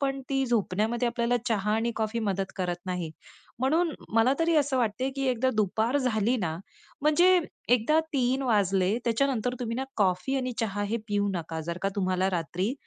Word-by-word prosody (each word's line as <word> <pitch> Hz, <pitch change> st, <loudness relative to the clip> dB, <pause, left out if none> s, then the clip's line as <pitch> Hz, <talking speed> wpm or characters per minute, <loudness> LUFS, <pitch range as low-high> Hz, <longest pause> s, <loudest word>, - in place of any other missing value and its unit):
पण 275 Hz, -1 st, -1 dB
ती 270 Hz, 0 st, +1 dB
झोपण्यामध्ये 230 Hz, +2 st, 0 dB
आपल्याला 240 Hz, 0 st, +1 dB
चहा 210 Hz, -1 st, 0 dB
आणि 230 Hz, +1 st, 0 dB
कॉफी 220 Hz, +1 st, -1 dB
मदत 195 Hz, 0 st, -2 dB
करत 180 Hz, -2 st, -1 dB
नाही. 180 Hz, -3 st, -3 dB, 0.5 s
म्हणून 315 Hz, +6 st, +2 dB, 0.2 s
मला 230 Hz, +4 st, +5 dB
तरी 330 Hz, 0 st, +2 dB
असं 280 Hz, -3 st, +2 dB
वाटते 245 Hz, +3 st, 0 dB
की 270 Hz, 0 st, -1 dB
एकदा 255 Hz, +2 st, +1 dB
दुपार 220 Hz, +5 st, +1 dB
झाली 240 Hz, -1 st, +1 dB
ना, 165 Hz, -7 st, -2 dB, 0.5 s
म्हणजे 350 Hz, +4 st, +5 dB, 0.4 s
एकदा 305 Hz, +8 st, +2 dB
3:00 260 Hz, 0 st, +1 dB
वाजले 200 Hz, -3 st, +2 dB
त्याच्यानंतर 250 Hz, 0 st, +1 dB
तुम्ही 230 Hz, -1 st, -2 dB
ना, 265 Hz, -, -1 dB
कॉफी 195 Hz, +6 st, +1 dB
आणि 255 Hz, -1 st, -2 dB
चहा 205 Hz, -2 st, -1 dB
हे 230 Hz, -, +1 dB
पिऊ 205 Hz, 0 st, +1 dB
नका. 165 Hz, -1 st, -4 dB
जर 170 Hz, +1 st, -3 dB
का 195 Hz, -, +2 dB
तुम्हाला 185 Hz, 0 st, +1 dB
रात्री 180 Hz, +5 st, -1 dB
230 Hz, 175 wpm, -27 LUFS, 195-260 Hz, 0.5 s, मला